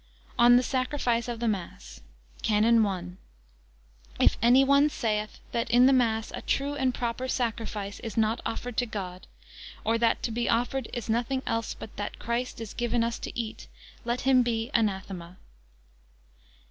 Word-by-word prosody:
ON 240 0 +8
THE 250 - +5
SACRIFICE 255 -3 0
OF 240 -2 -4
THE 235 - -1
MASS. 120 - -4 0.4
CANON 220 +2 +4
I. 185 -3 -3 1.2
If - - +5
any 245 +3 +6
one 280 +2 +5
saith, 215 -5 -2
that 235 - -1
in 245 +2 +6
the 270 - +6
mass 225 -3 +1
a - - -5
true 280 +1 -1
and 265 -3 +1
proper 245 +1 -3
sacriflce 225 -5 -3
is 230 -2 -7
not 225 +1 +1
offered 245 0 -4
to 245 - +1
God; 185 -4 -6 0.6
or, 225 +1 +1
that 230 -1 +2
to 235 - -1
be 235 +1 -1
offered 245 +2 0
is 240 - -5
nothing 240 +4 0
else 230 0 -2
but 215 - -10
that 205 - -4
Christ 235 +1 -3
is 225 -3 -7
given 240 0 0
us 230 0 -2
to - - -6
eat; 225 -2 -5 0.4
let 240 +1 -1
him 260 -1 +5
be 230 0 -1
anathema. 190 -5 -1
235 Hz, 165 wpm, -28 LUFS, 220-245 Hz, 1.2 s, ON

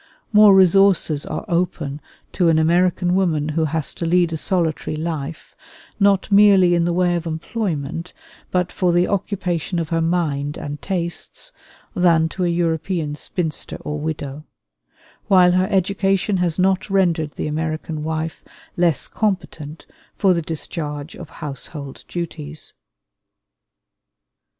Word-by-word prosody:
More 210 -2 +8
resources 190 -5 +4
are 155 - -4
open 170 -5 -1 0.3
to 175 -3 +2
an 160 - +4
American 175 +2 +2
woman 165 -6 +1
who 160 +1 0
has 155 0 -2
to - - -6
lead 170 0 +2
a - - 0
solitary 165 -3 -1
life, 155 -1 -5 0.4
not 200 0 +3
merely 200 -3 +6
in 170 -1 +2
the 175 - +1
way 175 0 +2
of 170 -1 -3
employment, 165 -2 -3 0.4
but 180 -1 0
for 180 -2 +1
the 175 +1 +3
occupation 180 -3 -2
of 165 -2 -2
her 165 -1 +1
mind 155 -4 -1
and 145 0 -6
tastes, 180 - -4 0.4
than 165 -3 +3
to 185 - -3
a - - +2
European 165 -2 -1
spinster 160 +1 -3
or 150 0 -4
widow; 150 -2 -4 0.8
while 180 -2 +6
her 185 +1 +2
education 195 +1 +1
has 175 -3 0
not 190 +1 +1
rendered 170 -6 +1
the - - -4
American 155 0 -3
wife 160 +1 -3 0.3
less 170 -4 +1
competent 165 -7 -3 0.3
for 190 -2 +3
the 170 - 0
discharge 150 -1 -5
of 170 - -10
household 140 -1 -7
duties. 155 -3 -5
170 Hz, 135 wpm, -21 LUFS, 155-185 Hz, 0.8 s, More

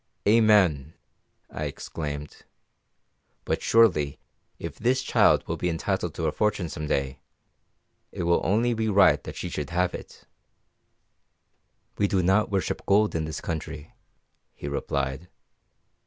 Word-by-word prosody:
"Amen!" 100 -10 +4 0.6
I 75 - -4
exclaimed. 75 0 -6 1.1
"But - - -1
surely, 80 -12 +3 0.4
if - - -7
this 130 +2 +1
child - - +3
will - - -2
be 90 - -1
entitled 85 0 -2
to 80 - -3
a 75 - +1
fortune 105 -4 -1
some 75 -2 -5
day, 70 -2 -1 0.9
it - - -4
will 85 0 +2
only 115 +5 +2
be 110 -1 -1
right 100 -1 +4
that - - -8
she - - -5
should 75 -2 -4
have 90 +1 0
it." - - -10 1.8
"We 100 - +3
do 95 -2 +1
not 95 +4 +3
worship 95 -1 -2
gold 105 +2 +3
in 80 -1 -1
this 80 - -5
country," 80 -2 -6 0.6
he - - -7
replied. 70 +2 -3
85 Hz, 135 wpm, -26 LUFS, 75-105 Hz, 1.8 s, Amen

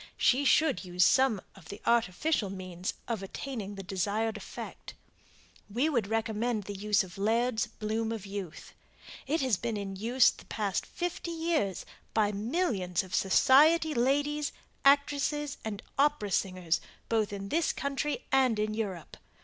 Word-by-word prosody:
She 270 +3 +3
should 295 -3 +3
use 180 -1 +2
some 260 -7 +4
of - - -15
the 200 - -7
artificial 235 - +1
means 185 -1 -5
of 230 -4 -2
attaining 205 0 -5
the 195 - -7
desired 205 +4 -1
effect. 210 - -8 0.7
We 250 +9 +1
would 235 -9 0
recommend 225 0 -1
the 205 - -6
use 205 +1 +2
of 185 0 -11
LAIRD'S 225 +2 +1
"BLOOM 220 +1 -3
OF 220 -3 -5
YOUTH." 195 -4 -7 0.5
It 310 +3 +1
has 255 -7 +2
been 230 +1 -3
in 195 -1 -5
use 235 +6 +4
the - - -15
past 205 -3 -2
fifty 350 0 -4
years 325 - -1 0.3
by 210 -2 +3
millions 205 - -1
of 185 -1 -12
society 305 - +5
ladies, 290 +4 +1 0.3
actresses 285 +1 +2
and 215 -2 -5 0.2
opera 285 -8 +2
singers 185 -3 0 0.3
both 220 -3 +1
in 200 -1 -5
this 330 +5 +2
country 280 +1 -2
and 260 -4 +4
in 215 0 0
Europe. 200 -7 -4
220 Hz, 150 wpm, -30 LUFS, 195-275 Hz, 0.7 s, society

